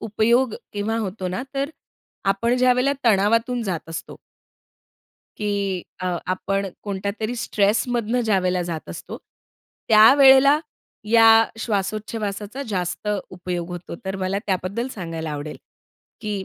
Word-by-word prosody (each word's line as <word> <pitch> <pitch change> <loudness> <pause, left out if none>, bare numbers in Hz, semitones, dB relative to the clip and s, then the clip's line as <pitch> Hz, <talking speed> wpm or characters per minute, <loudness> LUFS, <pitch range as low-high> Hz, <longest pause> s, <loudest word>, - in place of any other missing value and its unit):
उपयोग 225 +3 +2 0.2
केव्हा 210 +2 -2
होतो 190 -3 -3
ना, 185 +7 -3
तर 275 +2 -1 0.5
आपण 215 +5 +1
ज्यावेळेला 255 +2 +3
तणावातून 230 +3 +2
जात 180 -6 -4
असतो. 165 - -7 1.2
की 200 -3 -1 0.2
अ, 180 -1 -1
आपण 195 +2 -1 0.2
कोणत्यातरी 200 +3 -3
स्ट्रेस 210 -1 +1
मधनं 240 0 0
ज्यावेळेला 185 -4 +1
जात 170 -2 -5
असतो. - - -8 0.7
त्यावेळेला 270 +6 +7 0.5
या 230 -1 +7 0.3
श्वासोच्छवासाचा 215 +2 -3
जास्त 180 0 -3 0.2
उपयोग 180 -1 -4
होतो. 175 -1 -7
तर 190 0 -3
मला 190 +1 -1
त्याबद्दल 195 +6 -2
सांगायला 165 -4 -5
आवडेल, 150 +1 -5 0.6
की 205 -3 -3
205 Hz, 115 wpm, -22 LUFS, 185-230 Hz, 1.2 s, त्यावेळेला